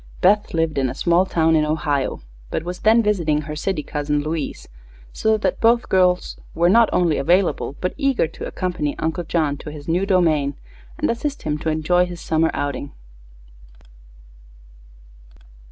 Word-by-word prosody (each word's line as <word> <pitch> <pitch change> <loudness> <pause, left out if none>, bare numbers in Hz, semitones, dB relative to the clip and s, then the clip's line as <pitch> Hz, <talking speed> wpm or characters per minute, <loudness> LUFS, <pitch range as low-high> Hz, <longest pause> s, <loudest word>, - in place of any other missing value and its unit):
Beth 205 -1 +2
lived 165 -3 0
in 130 -1 +1
a - - -6
small 175 +2 +2
town 160 -2 +2
in 155 - +3
Ohio, 150 - -1 0.3
but 160 - -3
was 180 +1 -6
then 225 +2 +4
visiting 170 -8 +1
her 150 0 -6
city 155 0 -2
cousin 145 0 -2
Louise, 155 -1 -4 0.5
so 220 0 +1
that 195 -3 -2
both 235 +1 +3
girls 180 -1 +2 0.2
were 170 +1 +3
not 230 +3 +5
only 170 -4 +2
available 175 -1 +1
but 180 - -2
eager 275 -8 +1
to 160 - -8
accompany 175 -6 -3
Uncle 160 +2 -2
John 155 -3 0
to 150 - -9
his 145 -1 -10
new 180 +4 0
domain 155 -7 +2 0.4
and - - 0
assist 280 +5 -4
him 150 -1 -2
to 160 - -2
enjoy 175 +3 +2
his 175 -1 -8
summer 160 0 +1
outing. 140 0 -4
165 Hz, 160 wpm, -21 LUFS, 150-185 Hz, 0.5 s, not